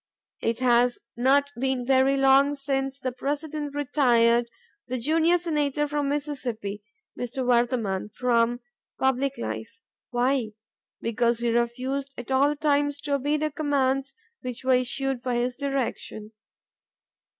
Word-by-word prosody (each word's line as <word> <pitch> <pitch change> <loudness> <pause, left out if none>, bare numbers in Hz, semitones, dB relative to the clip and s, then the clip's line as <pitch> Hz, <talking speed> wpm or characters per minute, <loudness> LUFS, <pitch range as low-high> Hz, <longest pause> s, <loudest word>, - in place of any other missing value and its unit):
It 230 +2 -1
has 245 0 +3 0.2
not 275 +3 +3
been 265 -1 0
very 265 +1 +3
long 270 +1 +5
since 270 -1 -2
the 255 -2 -2
President 290 +2 -4
retired 240 -5 +3 0.4
the 255 +1 -2
junior 320 +7 +3
Senator 295 -4 0
from 290 -1 -1
Mississippi 255 -8 -3 0.3
[Mr. 250 +2 -4
Vardaman] 235 -5 +1
from 240 -1 +1 0.4
public 265 +1 +1
life. - - -5 0.3
Why? 245 -2 0 0.5
Because 235 +1 +1
he 235 0 0
refused 260 +4 -1
at 245 +2 -7
all 280 +3 +3
times 290 -1 +1
to 290 -1 -2
obey 285 +2 +1
the 305 0 -1
commands 275 -2 0 0.3
which 250 -1 -6
were 260 0 +3
issued 255 +1 0
for 250 0 -2
his 245 +1 0
direction. 265 -6 -3
265 Hz, 130 wpm, -26 LUFS, 245-285 Hz, 0.5 s, long